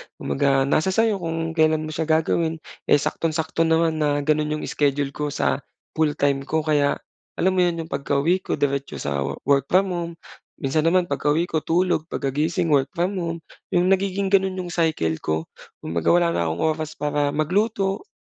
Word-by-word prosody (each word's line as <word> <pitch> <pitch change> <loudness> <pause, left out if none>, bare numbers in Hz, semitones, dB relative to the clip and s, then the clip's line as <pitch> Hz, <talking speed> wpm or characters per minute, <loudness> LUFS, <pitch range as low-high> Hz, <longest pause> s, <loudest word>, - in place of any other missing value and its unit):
Kumbaga 135 -1 +1
nasa 155 +5 +1
sa'yo 215 +1 +2
kung 165 -1 -3
kailan 155 -1 +2
mo 155 - -5
s'ya 160 +1 -2
gagawin, 160 +1 +1 0.3
eh, - - +6
saktong-sakto 160 +2 0
naman 160 -1 +2
na 145 -1 +1
gano'n 155 0 +1
'yong 155 - -5
schedule 140 -1 0
ko 150 +1 -3
sa 145 0 0 0.3
full-time 145 -3 0
ko. 160 -1 0
Kaya 145 -2 +2 0.4
alam 190 +2 +2
mo 185 - 0
'yon 170 -2 +1
'yong 160 - -14
pagkauwi 140 +6 +1
ko - - -3
diretso 140 -1 -1
sa 70 -1 -2
wo 70 - -2
work 140 0 +2
from 190 +1 +2
home. 170 -1 -3 0.4
Minsan 155 +3 0
naman 175 -2 +2
pagkauwi 145 +4 +1
ko 160 -3 -1
tulog, 170 -1 0
pagkagising 155 +5 -1
work 135 -2 +3
from 185 +3 -1
home 165 -1 -3 0.4
'yong 180 +2 +3
nagiging 195 0 +1
gano'n 190 -1 +3
'yong 175 - -7
cycle 155 - 0
ko. 80 +1 -1 0.4
Kumbaga 85 0 -3
wala 170 -1 +4
na 85 - 0
akong 80 +1 -2
oras 155 0 -5
para 145 -1 -1
magluto, 195 - 0
160 Hz, 180 wpm, -23 LUFS, 145-175 Hz, 0.4 s, eh